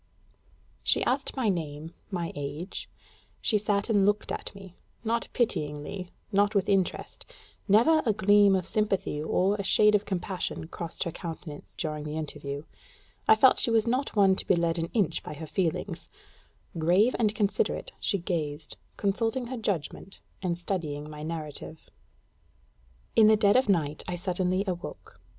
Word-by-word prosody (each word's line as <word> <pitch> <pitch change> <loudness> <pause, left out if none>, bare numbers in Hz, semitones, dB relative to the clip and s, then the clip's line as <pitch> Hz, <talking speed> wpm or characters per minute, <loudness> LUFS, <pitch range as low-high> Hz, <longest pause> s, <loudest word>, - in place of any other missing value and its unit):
She - - +3
asked 270 +2 0
my 255 -4 +1
name, 160 -4 -3 0.2
my 175 -4 -3
age; 145 +6 -5 0.5
she 215 - +1
sat 205 -1 0
and 205 -4 +3
looked 205 +1 +1
at - - -5
me 190 -2 -12 0.3
not 230 +1 0
pityingly, 175 -4 -2 0.2
not 205 +1 +3
with 195 -2 +2
interest: 195 -3 0 0.4
never 240 +11 +5
a 225 - +3
gleam 205 -1 +5
of 185 -2 -1
sympathy 195 -6 0
or 190 +6 +1
a 200 - -3
shade 210 +2 +5
of 210 0 +2
compassion 185 -3 -3
crossed 170 -2 -5
her 170 - -3
countenance 160 -3 -8
during 155 -3 -3
the 150 +1 -4
interview. 145 -2 -5 0.6
I 220 - +8
felt 255 +4 +5
she - - +2
was 225 -2 +3
not 255 +3 -1
one 195 -2 +5
to - - -5
be 185 - +5
led 170 0 0
an 165 0 -2
inch 205 -9 +1
by 150 - -7
her 160 - -7
feelings: 170 +1 -2 0.7
grave 185 +9 +4
and 215 -2 +2
considerate, 205 -3 0
she 200 - +1
gazed, 160 -4 -3 0.2
consulting 225 +5 0
her - - -3
judgment 195 -3 -3 0.2
and 175 -3 -1
studying 155 -5 -4
my 150 0 -8
narrative.... 155 0 -6 1.2
In 220 -1 +7
the 215 0 +6
dead 205 -1 +4
of 255 -3 +3
night 155 -6 +1
I 180 - -2
suddenly 185 +1 0
awoke. 180 -2 -6
190 Hz, 160 wpm, -28 LUFS, 160-210 Hz, 1.2 s, I